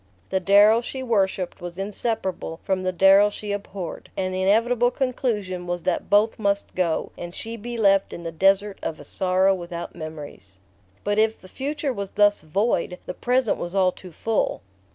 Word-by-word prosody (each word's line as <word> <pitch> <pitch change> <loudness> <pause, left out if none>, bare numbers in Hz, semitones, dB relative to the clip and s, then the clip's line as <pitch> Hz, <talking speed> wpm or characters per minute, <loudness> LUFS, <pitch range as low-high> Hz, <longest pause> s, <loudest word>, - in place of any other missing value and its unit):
The 190 - +2
Darrow 205 +4 +6
she 260 +2 -6
worshipped 195 -6 0
was 175 0 -7
inseparable 195 -4 -2
from 190 -1 0
the 185 0 0
Darrow 195 +3 +6
she 210 0 -6
abhorred; 200 -3 -6
and 185 -1 -1
the 185 - -1
inevitable 230 +5 +3
conclusion 220 -9 -2
was 175 -1 -3
that 180 - -1
both 210 +3 +3
must 200 -1 0
go, 170 -3 -1
and 175 0 -7
she 225 +1 -5
be 235 +2 -6
left 195 -3 +3
in 170 - -8
the 165 - -4
desert 195 +4 +2
of 160 - -4
a - - -10
sorrow 190 +1 +2
without 175 -2 -6
memories... 150 -12 -9 0.5
But 205 +1 +1
if 220 0 +2
the 185 - -14
future 280 +5 -3
was 200 -3 -6
thus 205 0 +4
void, 180 +2 0
the - - -5
present 250 +2 +1
was 175 +2 -5
all 185 -2 +4
too 180 0 -13
full. 220 +6 -1
195 Hz, 180 wpm, -24 LUFS, 180-220 Hz, 0.5 s, Darrow